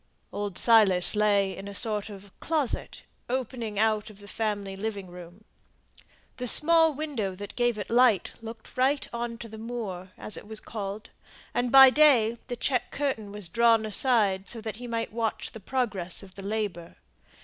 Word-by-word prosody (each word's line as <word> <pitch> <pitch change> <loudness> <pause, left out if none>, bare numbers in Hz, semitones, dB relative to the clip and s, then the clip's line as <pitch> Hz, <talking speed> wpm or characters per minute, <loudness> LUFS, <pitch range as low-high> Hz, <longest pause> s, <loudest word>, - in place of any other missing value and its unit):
Old 205 -3 -4
Silas 210 -6 +4
lay 200 -2 +2
in 195 - -9
a 200 - -3
sort 210 +1 0
of 200 -1 -12
closet, 310 -6 -2 0.3
opening 240 -4 -3
out 215 0 +1
of 210 - -14
the 205 0 -14
family 205 -2 -3
living 200 -1 -4
room. 180 +2 -13 0.9
The 250 - -3
small 325 +5 +6
window 260 -11 -3
that 200 +1 -9
gave 240 -2 +1
it 205 - -5
light 235 -4 +3
looked 225 0 -10
right 270 +3 +1
on 235 0 -4
to 235 - -8
the 220 0 -10
"moor," 215 -6 -6
as 215 - +1
it - - -10
was 220 0 -7
called; 210 -1 -7 0.4
and 245 0 -1
by 270 -1 +9
day 245 -6 +4
the 245 - -4
check 250 0 -1
curtain 260 -8 -3
was 205 -3 -6
drawn 230 +3 +3
aside 210 -4 +2
so 235 - -2
that 220 -2 -6
he 245 +1 -8
might 230 -2 -3
watch 230 -1 -3
the 225 - -10
progress 205 -6 -2
of 190 -1 -14
the 195 - -9
labour. 200 -4 -4
220 Hz, 175 wpm, -27 LUFS, 200-240 Hz, 0.9 s, by